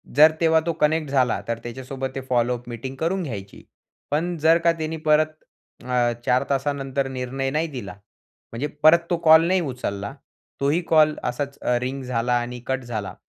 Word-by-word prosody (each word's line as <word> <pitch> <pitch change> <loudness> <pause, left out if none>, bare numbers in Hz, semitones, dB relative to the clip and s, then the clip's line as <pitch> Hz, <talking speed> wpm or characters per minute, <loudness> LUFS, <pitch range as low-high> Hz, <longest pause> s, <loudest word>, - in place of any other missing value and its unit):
जर 155 +2 +8
तेव्हा 160 -1 +5
तो 170 - 0
कनेक्ट 155 0 +2
झाला, 130 -4 +2
तर 115 -1 -2
त्याच्यासोबत 130 +2 -5
ते 135 - -3
फॉलो 125 0 +2
अप 120 +1 -14
मीटिंग 120 +3 -6
करून 180 +4 0
घ्यायची. 100 - -7 0.5
पण 165 +4 0
जर 160 +2 +5
का 170 - +6
त्यांनी 160 +1 -3
परत 155 +1 +5 0.6
अ, 125 -1 +1
4 125 +2 +3
तासानंतर 135 -1 -1
निर्णय 130 +1 -3
नाही 155 +3 0
दिला. 120 - -7 0.6
म्हणजे 120 +6 -3 0.2
परत 160 +2 +8
तो 175 - +1
कॉल 160 0 +7
नाही 185 +1 +2
उचलला, 125 -8 -4 0.5
तोही 145 +5 +2
कॉल 155 -1 +5
असाच 140 +3 -3 0.2
रिंग 135 +2 -3
झाला 125 -1 -1
आणि 120 +1 -5
कट 130 0 -1
झाला. 110 -5 -5
135 Hz, 170 wpm, -23 LUFS, 125-155 Hz, 0.6 s, जर